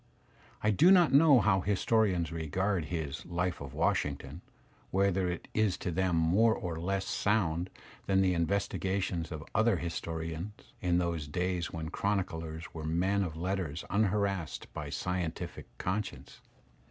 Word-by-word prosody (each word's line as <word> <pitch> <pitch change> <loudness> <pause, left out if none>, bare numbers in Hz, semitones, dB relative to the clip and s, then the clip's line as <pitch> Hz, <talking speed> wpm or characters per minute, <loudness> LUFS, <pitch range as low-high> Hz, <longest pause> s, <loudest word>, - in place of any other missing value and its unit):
I 105 - +4
do 155 - +5
not 180 -6 +6
know 140 -3 +7
how 95 -3 +3
historians 100 -3 +1
regard 85 +3 -1
his 75 -5 -4
"life 90 -2 -2
of 70 -2 -7
Washington," 70 +2 -1 0.5
whether 95 -1 +2
it 85 - -5
is 110 -4 +2
to 90 - -3
them 90 0 +1
more 95 +8 +4
or 85 -3 -4
less 95 +3 -1
sound 90 -4 0 0.4
than 95 0 +3
the 95 -1 +3
investiga 95 +2 0
tions 85 -3 -3
of 80 -1 -5
other 110 -2 +3
historians 85 +3 -5
in 90 -1 +2
those 85 -4 -1
days 90 +2 -1
when 80 -1 -4
chroniclers 85 -5 -2
were 80 - -6
men 90 +6 +1
of 80 -5 -3
letters 90 -3 -2
unharassed 100 -4 0
by 75 -1 -5
"scientific" 85 +2 -3
conscience. 105 +3 -4
90 Hz, 140 wpm, -31 LUFS, 80-100 Hz, 0.5 s, know